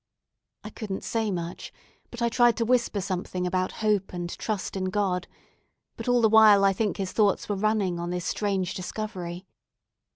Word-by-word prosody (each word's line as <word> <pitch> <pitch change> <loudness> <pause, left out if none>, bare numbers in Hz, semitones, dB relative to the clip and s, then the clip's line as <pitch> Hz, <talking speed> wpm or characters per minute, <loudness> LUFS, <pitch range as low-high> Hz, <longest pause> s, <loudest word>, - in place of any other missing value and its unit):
I 215 - -8
couldn't 205 -3 -5
say 225 -2 -1
much, 175 -3 -5 0.4
but 240 0 -5
I 235 - +3
tried 240 0 +4
to 230 - 0
whisper 235 -4 +1
something 185 -1 -3
about 185 +1 0
hope 205 -3 +1
and 175 -1 -4
trust 210 -3 -3
in 190 -1 -2
God; 185 -2 -1 0.7
but - - -8
all 245 -1 +3
the 225 - +6
while 215 -2 +7
I 195 0 +4
think 210 +1 -1
his 195 -2 -3
thoughts 205 -3 +2
were 205 - -1
running 200 -3 0
on 170 0 -3
this 180 -1 -3
strange 195 -3 -1
discovery. 185 -2 -5
200 Hz, 175 wpm, -26 LUFS, 185-215 Hz, 0.7 s, while